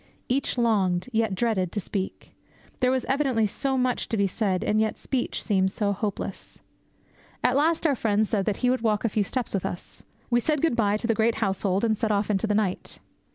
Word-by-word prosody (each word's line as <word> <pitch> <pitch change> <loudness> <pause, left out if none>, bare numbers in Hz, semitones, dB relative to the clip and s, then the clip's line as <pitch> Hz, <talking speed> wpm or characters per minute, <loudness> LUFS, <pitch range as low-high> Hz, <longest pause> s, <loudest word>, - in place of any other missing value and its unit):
Each 265 +1 0
longed, 200 -5 +1
yet 220 -3 +1
dreaded, 190 -5 0
to 210 - -1
speak. 195 0 -5 0.5
There 250 - +3
was 260 -1 0
evidently 265 -5 +1
so 265 +6 -1
much 250 -1 0
to 225 - -1
be 200 - +3
said, 190 -1 -1
and 215 +1 +2
yet 220 - 0
speech 260 -2 -2
seemed 190 -3 +2
so 200 +1 -1
hopeless. 205 0 -5 0.8
At 250 - +3
last 320 +4 +2
our 290 -4 +3
friend 220 -2 +1
said 200 -2 -1
that 205 - 0
he 250 - +4
would 255 - 0
walk 220 -1 +1
a - - +3
few 210 0 +1
steps 245 +3 -2
with 195 - -1
us. 175 - -6 0.3
We 240 - +4
said 300 +5 0
good 325 -4 +2
bye 210 -3 +2
to 225 - -4
the 230 - +2
great 225 +1 +2
household 195 -2 0
and 220 -1 +2
set 220 0 -1
off 205 +1 +1
into 200 +2 0
the 210 - +1
night. 205 -4 -1
220 Hz, 215 wpm, -26 LUFS, 200-245 Hz, 0.8 s, he